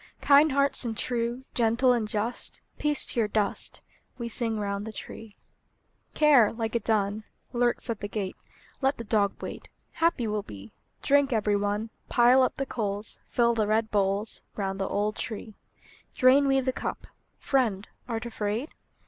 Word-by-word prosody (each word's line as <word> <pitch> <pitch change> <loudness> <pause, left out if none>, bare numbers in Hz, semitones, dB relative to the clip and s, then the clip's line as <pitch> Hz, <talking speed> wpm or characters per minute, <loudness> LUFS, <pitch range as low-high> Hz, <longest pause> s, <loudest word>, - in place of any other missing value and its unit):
Kind 290 +2 +6
hearts 280 0 +3
and 225 -3 -3
true, 240 +1 -2
Gentle 235 +2 +3
and 230 -3 -1
just, 215 +3 -4 0.2
Peace 295 -1 +3
to - - -2
your 220 - +2
dust! 210 -1 -2 0.4
We 235 -2 -4
sing 225 -1 -1
round 200 0 -3
the - - -5
tree. 215 0 -10 0.8
Care, 285 -8 +5
like 225 -1 -3
a 235 - +2
dun, 215 -1 0 0.3
Lurks 240 0 +1
at 230 -4 -3
the 205 - -4
gate: 205 -3 -4 0.5
Let 270 +1 +1
the 235 - -6
dog 205 -2 0
wait; - - -7 0.2
Happy 330 -7 +1
we'll 210 -1 -1
be! 105 - -11 0.3
Drink, 285 -1 +3
every 210 -3 +1
one; 205 +2 -1 0.2
Pile 245 +2 +5
up 255 - +1
the 275 - -1
coals; 210 -4 -4
Fill 235 -1 +2
the 220 -2 0
red 220 +1 +1
bowls, 200 +1 0
Round 195 -1 -3
the 195 - -1
old 210 +1 -1
tree! 220 0 -6 0.6
Drain 275 +2 +5
we 270 0 +3
the 260 0 -1
cup. - - -5 0.3
Friend, 225 -8 0 0.2
art 230 -1 -3
afraid? 220 +4 -3
225 Hz, 165 wpm, -27 LUFS, 210-255 Hz, 0.8 s, Kind